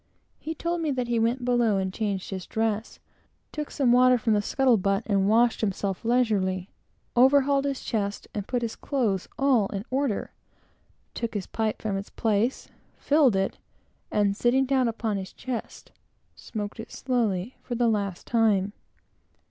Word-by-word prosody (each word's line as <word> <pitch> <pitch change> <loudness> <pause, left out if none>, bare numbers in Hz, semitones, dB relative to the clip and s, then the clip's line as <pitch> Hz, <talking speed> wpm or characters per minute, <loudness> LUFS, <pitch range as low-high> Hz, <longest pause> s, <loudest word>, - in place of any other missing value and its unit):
He 320 +1 -5
told 340 +2 -2
me 315 - 0
that 250 -3 -1
he 235 -1 +1
went 240 +3 0
below 240 -4 +2
and 190 -1 -2
changed 200 -3 -3
his 190 -2 -5
dress; 220 0 -2 0.5
took 300 -1 -4
some 260 -4 +2
water 250 0 +6
from 225 -1 +1
the 205 - +3
scuttle 255 +2 +3
butt 195 +2 0
and 200 -2 +2
washed 235 +2 +3
himself 195 -2 -2
leisurely; 205 -6 +1 0.4
overhauled 275 +2 +4
his 275 -2 -2
chest, 205 -2 -2
and 205 -2 -4
put 245 -2 -1
his 225 -1 -3
clothes 225 -10 -1
all 260 -7 +3
in 200 +1 -5
order; 265 -5 -1 0.8
took 230 -1 -4
his 195 -3 -2
pipe 220 -1 -2
from 205 -3 -1
its 195 - -6
place, 225 +3 0 0.3
filled 285 -7 +3
it, 195 0 -1 0.5
and 205 -1 +2
sitting 245 +5 +2
down 260 -2 +2
upon 225 -2 -2
his 190 -1 -6
chest, 255 -3 -6 0.4
smoked 210 0 -6
it 225 - -8
slowly 235 -4 -1
for 245 - -5
the 240 0 +2
last 200 -5 -1
time. 210 -4 +2
225 Hz, 165 wpm, -26 LUFS, 200-255 Hz, 0.8 s, water